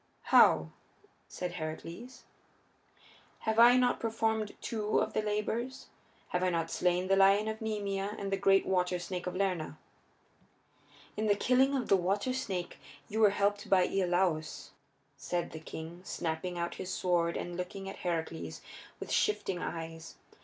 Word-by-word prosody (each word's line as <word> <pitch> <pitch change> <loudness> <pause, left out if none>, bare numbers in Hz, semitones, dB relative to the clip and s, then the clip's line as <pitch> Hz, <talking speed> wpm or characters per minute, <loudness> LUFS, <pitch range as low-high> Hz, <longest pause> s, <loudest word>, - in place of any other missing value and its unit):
"How?" 80 0 +6 0.6
said 180 -1 -4
Heracles. 170 +9 -7 1.2
"Have 220 0 0
I 240 +2 +8
not 250 -1 +2
performed 220 -1 -1
two 215 -2 -1
of - - -1
the - - +1
labors? 215 +5 -3 0.4
Have 180 - -1
I 185 - +2
not 165 -2 -1
slain 180 +1 +1
the 195 - +4
lion 195 +2 +5
of 220 0 -4
Nemea 205 -2 -2
and 195 -1 -4
the - - +3
great 195 0 +4
water 180 -1 +1
snake 180 +1 -5
of 180 - -3
Lerna?" 180 -6 -1 1.4
"In 215 0 -1
the 205 - +4
killing 260 +6 +3
of 250 -4 -1
the 195 - +5
water 200 +7 0
snake 195 -9 -4 0.3
you 220 - -2
were 215 -2 +7
helped 205 +1 0
by 185 -2 +5
Iolaus," 180 -4 0 0.5
said 175 -1 -3
the 160 - -7
king, 160 +2 -8
snapping 175 0 -3
out 170 0 -2
his 185 - -4
words 170 -2 +2
and 175 0 -5
looking 185 +2 -5
at 195 - -7
Heracles 165 -2 -3 0.4
with - - -6
shifting 195 - +1
eyes. 165 -1 -6
190 Hz, 155 wpm, -31 LUFS, 175-215 Hz, 1.4 s, I